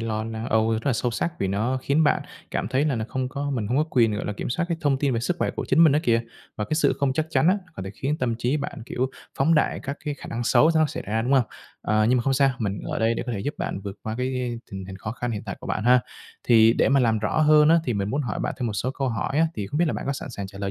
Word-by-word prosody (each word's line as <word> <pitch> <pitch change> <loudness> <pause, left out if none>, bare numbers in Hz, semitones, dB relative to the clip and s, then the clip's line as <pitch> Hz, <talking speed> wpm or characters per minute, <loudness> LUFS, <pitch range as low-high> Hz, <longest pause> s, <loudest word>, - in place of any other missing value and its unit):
lo 110 -1 -2
na 110 0 -5
âu 110 +1 +3
rất 110 +5 -2
là 135 - +3
sâu 120 +2 0
sắc 170 +8 -2
vì 95 - 0
nó 115 +7 0
khiến 150 +3 +2
bạn - - +2 0.3
cảm 100 - -2
thấy 135 +3 +1
là 145 -4 +1
nó 110 - -2
không 130 -1 -2
có 145 +1 -3
mình 115 -7 -2
hông 125 +5 0
có 155 - +3
quyền, 115 -4 +3
gọi - - -4
là, 105 - -2
kiểm 100 - -5
soát 170 +7 0
cái 170 - -1
thông 140 -2 +1
tin 140 -2 +1
về 115 - 0
sức 175 +8 -1
khỏe - - 0
của - - -5
chính 165 - +6
mình 150 - +6
đó 150 - +3
kìa. 115 -1 +3 0.4
Và 105 - -2
cái 155 - -2
sự 160 - +3
không 140 -2 +1
chắc 155 +3 -1
chắn 165 - +3
á, 200 +2 +3 0.2
có 95 - -6
thể 95 - -5
khiến 140 +8 -2
tâm 120 -2 0
trí 125 +5 +1
bạn, 140 -5 -5
kiểu, 130 +1 -2 0.3
phóng 160 +5 +4
đại 155 - +1
các 140 +1 -4
cái 145 -1 -2
khả - - -11
năng 120 +1 -3
xấu 155 +7 +5
nó 155 -1 +4
xảy 155 +2 -5
ra, 110 +2 0
đúng 130 +3 0
hông? 130 -3 +5 0.4
Ờ, 110 0 +2
nhưng 125 - +4
mà - - 0
không 135 - +1
sao, 135 0 +4
mình 100 -3 -2
ở - - -3
đây 115 +1 +2
để - - -2
có 120 - -2
thể 100 - -3
giúp 145 +9 -3
bạn 95 - -3
vượt 100 0 -7
qua 110 0 -4
cái 125 -2 -2
tình 95 -1 -6
hình 95 0 -8
khó 105 +3 -5
khăn 120 0 -3
hiện 105 -2 -4
tại 100 - -4
của - - -9
bạn 105 - -2
ha. 125 +1 +6 0.4
Thì 115 -1 +6
để - - +2
mà 140 0 +4
làm 115 -3 +2
rõ 110 +8 0
hơn 150 0 +6
á 165 - +6
thì 120 - -1
mình 100 0 -1
muốn 145 +2 0
hỏi 120 - -3
bạn - - -2
thêm 125 - -1
một 110 - -2
số 125 +5 -1
câu 135 -1 -2
hỏi 120 +6 -1
á, 165 - +5
thì 100 - -4
không 145 - -3
biết 175 - +4
là - - 0
bạn - - -5
có 140 - 0
sẵn 135 - -6
sàng 100 -4 -5
trả 100 0 -12
lời 100 -1 -2
125 Hz, 335 wpm, -24 LUFS, 110-140 Hz, 0.4 s, chính